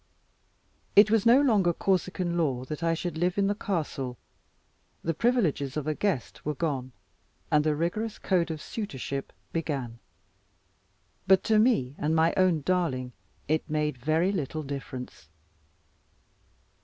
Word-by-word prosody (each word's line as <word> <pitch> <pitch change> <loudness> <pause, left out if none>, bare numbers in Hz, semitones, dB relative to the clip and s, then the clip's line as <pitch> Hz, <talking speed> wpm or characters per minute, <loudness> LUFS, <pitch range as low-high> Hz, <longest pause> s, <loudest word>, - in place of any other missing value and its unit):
It 210 +1 +7
was 225 0 +3
no 245 +3 +7
longer 205 -11 +3
Corsican 185 -1 0
law 135 -7 0
that 150 +4 -6
I 165 0 +1
should 165 -1 -4
live 180 +2 +1
in 200 - +3
the 200 - +2
castle. 150 - -3 0.9
The 165 - 0
privileges 165 - +1
of 150 - -2
a 155 - 0
guest 170 - -2
were 150 0 -2
gone; 135 -5 -2 0.6
and 150 0 +4
the 155 -1 +1
rigorous 205 +8 -2
code 175 -3 +1
of 155 -2 -4
suitorship 140 - -4 0.3
began. 135 -8 -3 1.3
But 190 0 +5
to 220 -1 +3
me 215 - +2
and 155 +2 +1
my 160 +1 +3
own 185 -4 +3
darling 140 -7 -1 0.3
it 155 +2 0
made 150 -1 0
very 155 +9 +1
little 155 -4 -3
difference. 130 - -7
160 Hz, 140 wpm, -28 LUFS, 140-190 Hz, 1.3 s, It